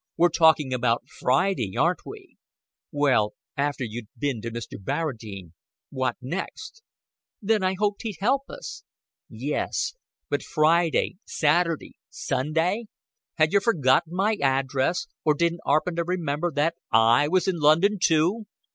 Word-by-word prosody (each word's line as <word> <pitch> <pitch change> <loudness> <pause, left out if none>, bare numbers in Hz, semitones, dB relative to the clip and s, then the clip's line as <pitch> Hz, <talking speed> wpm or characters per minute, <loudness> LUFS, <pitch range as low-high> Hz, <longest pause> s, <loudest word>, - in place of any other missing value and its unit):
We're 175 +1 +5
talking 160 -6 +3
about 120 -1 +1 0.2
Friday, 130 - +1
aren't 175 +2 +1
we? 410 -3 -12 0.5
Well, 140 -8 +2 0.2
after 140 -2 -1
you'd 115 -1 -6
bin 140 -6 -2
to 115 - -4
Mr. 115 -3 -7
Barradine, 105 - -4 0.4
what 130 -3 -1
next?" 190 - -6 0.6
"Then 215 0 +1
I 185 0 +1
hoped 205 0 0
he'd 220 -5 -5
help 265 +7 0
us." 460 -3 -8 0.5
"Yes, 475 - -2 0.3
but - - -1
Friday, 165 +3 +2
Saturday, 165 +1 0
Sunday? 160 - -1 0.5
Had 155 +1 +2
yer 200 - +4
forgotten 160 - +2
my 210 +3 +1
address 135 +4 +1 0.2
or 150 -1 +3
didn' 170 +2 0
'aarpen 170 +2 +1
to 170 - +1
remember 170 -2 -2
that 155 +3 +1 0.2
I 115 +5 +5
was 185 +4 +1
in 185 -2 0
London, 165 +8 +4
too?" 180 +8 +2
160 Hz, 135 wpm, -25 LUFS, 130-185 Hz, 0.6 s, We're